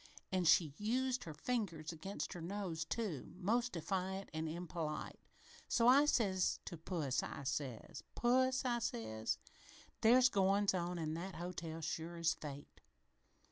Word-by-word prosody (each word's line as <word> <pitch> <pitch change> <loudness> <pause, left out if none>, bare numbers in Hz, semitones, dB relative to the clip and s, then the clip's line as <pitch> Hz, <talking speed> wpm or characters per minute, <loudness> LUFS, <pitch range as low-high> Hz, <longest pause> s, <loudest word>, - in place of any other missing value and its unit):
An' 185 -2 +1
she 160 -2 +5
used 250 +4 0
her 160 - -6
fingers 175 -9 -2
against 170 +5 -5
her 175 - -7
nose, 175 -3 -3
too, 190 - -3
most 235 +6 +1
defiant 190 +3 -2
and 160 0 -2
impolite. 165 -2 -4 0.5
So 235 -1 +3
I 275 +4 +8
says 195 -10 +2
to - - -5
puss 160 -5 -1
I 140 - -6
says, 130 -3 -3
'Puss,' 260 +2 +3
I 240 -1 +1
says, 110 - -2 0.6
'there's 250 +3 +7
goin's 200 0 +3
on 175 -1 -1
in 155 -2 -2
that 175 +3 -5
hotel, 170 -2 -5
sure 165 +2 -3
as 165 0 +2
fate. 145 -1 -9
180 Hz, 140 wpm, -37 LUFS, 160-215 Hz, 0.6 s, I